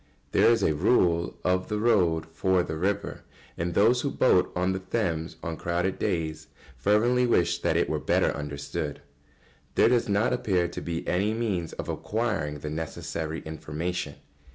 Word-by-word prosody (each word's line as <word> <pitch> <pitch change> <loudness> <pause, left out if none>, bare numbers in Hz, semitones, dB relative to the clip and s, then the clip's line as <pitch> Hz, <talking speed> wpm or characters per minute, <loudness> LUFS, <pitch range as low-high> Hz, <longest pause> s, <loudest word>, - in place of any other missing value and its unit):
] - - -37
There - - +5
is 115 -3 +3
a 80 - +3
rule 85 0 +2
of 90 0 +1
the 105 - -2
road 95 -8 +2
for 95 +1 +2
the 80 - -4
river, 100 +5 -2 0.3
and 85 0 -3
those 120 +5 +4
who 140 - -1
boat 95 -9 +3
on 90 +1 +1
the 95 - -2
Thames 90 -5 -2
on 85 -1 -4
crowded 90 +2 -1
days 80 -2 -2 0.3
fervently 120 +5 +3
wish 85 -7 +2
that - - +1
it - - +2
were - - -1
better - - +2
understood. 70 0 -5 0.7
There - - +5
does 120 -3 +2
not 100 +4 +2
appear 95 -8 +1
to - - -7
be 85 -1 -4
any 100 +5 +1
means 100 -8 -2
of - - -6
acquiring 100 -10 -2
the 75 - -4
necessary 80 0 -4
information. 80 0 -4
90 Hz, 170 wpm, -27 LUFS, 80-105 Hz, 0.7 s, There